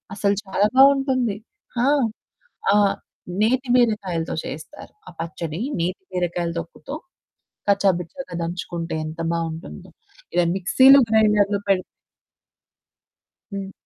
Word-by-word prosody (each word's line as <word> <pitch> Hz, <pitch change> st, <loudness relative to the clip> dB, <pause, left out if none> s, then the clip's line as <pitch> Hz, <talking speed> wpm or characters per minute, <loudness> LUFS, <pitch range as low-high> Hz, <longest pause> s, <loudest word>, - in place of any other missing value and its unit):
అసలు, 200 Hz, 0 st, +1 dB
చాలా 195 Hz, +1 st, +2 dB
బావుంటుంది. 265 Hz, -5 st, +4 dB, 0.5 s
ఆ! -, -, +3 dB, 0.9 s
ఆహ్, 205 Hz, -1 st, +4 dB, 0.5 s
నేతి 255 Hz, +4 st, +1 dB
బీరకాయలతో 200 Hz, -9 st, 0 dB
చేస్తారు. 160 Hz, -, -9 dB, 0.2 s
ఆ -, -, -8 dB
పచ్చడి 165 Hz, 0 st, -5 dB, 0.2 s
నేతి 180 Hz, +3 st, -2 dB
బీరకాయలు 175 Hz, -1 st, -1 dB
తొక్కుతో 170 Hz, -, -9 dB, 0.8 s
కచ్చా 200 Hz, 0 st, +4 dB
బిచ్చాగా 180 Hz, -, -8 dB
దంచుకుంటే, 170 Hz, -1 st, -4 dB
ఎంత 160 Hz, +2 st, -6 dB
బాగుంటుందో. 165 Hz, -, -5 dB, 0.4 s
ఇలా 175 Hz, 0 st, +3 dB
మిక్సీ‌లు, 260 Hz, +9 st, +6 dB
గ్రైండర్లు 210 Hz, -2 st, +3 dB
పేడి 190 Hz, -2 st, +2 dB, 1.7 s
హ్మ్. 195 Hz, -1 st, -5 dB
195 Hz, 100 wpm, -22 LUFS, 170-220 Hz, 1.7 s, మిక్సీ‌లు